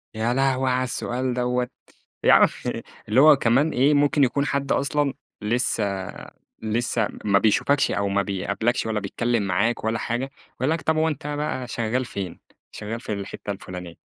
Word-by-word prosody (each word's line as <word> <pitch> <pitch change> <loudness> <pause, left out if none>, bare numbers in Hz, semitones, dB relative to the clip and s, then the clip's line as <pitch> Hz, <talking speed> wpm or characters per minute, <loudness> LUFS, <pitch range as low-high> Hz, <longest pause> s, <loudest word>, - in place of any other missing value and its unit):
يا 115 +2 0
لهوي 135 0 +1
على 125 0 +1
السؤال 125 0 -2
دوّة! 125 0 0 0.6
يا - - +7
عمّي! - - +3 0.3
اللي 110 +5 +4
هو 150 0 +8
كمان 135 +5 +3
إيه؟ 140 +4 +3
ممكن 145 0 +4
يكون 140 +3 0
حد 140 -1 0
أصلًا 140 0 +1 0.3
لسه 115 0 0 0.8
لسه 110 0 0 0.2
ما 100 -2 +4
بيشوفكش 130 +7 +2
أو 100 0 0
ما 100 0 +1
بيقابلكش، 100 +5 -1
ولا 110 -1 -1
بيتكلّم 115 +1 -1
معاك 100 +5 0
ولا 110 +1 0
حاجة 125 +4 -2 0.3
يقول 130 +4 +2
لك: 160 0 -1
"طَب 160 - +1
هو 160 +1 +2
أنت 150 -2 -4
بقى 145 -4 -3
شغال 115 +3 -1
فين؟" 95 -7 -6 0.3
شغال 115 +2 -5
في 110 - -5
الحِتّة 100 0 -5
الفُلانية، 90 -3 -8
120 Hz, 165 wpm, -24 LUFS, 105-135 Hz, 0.8 s, هو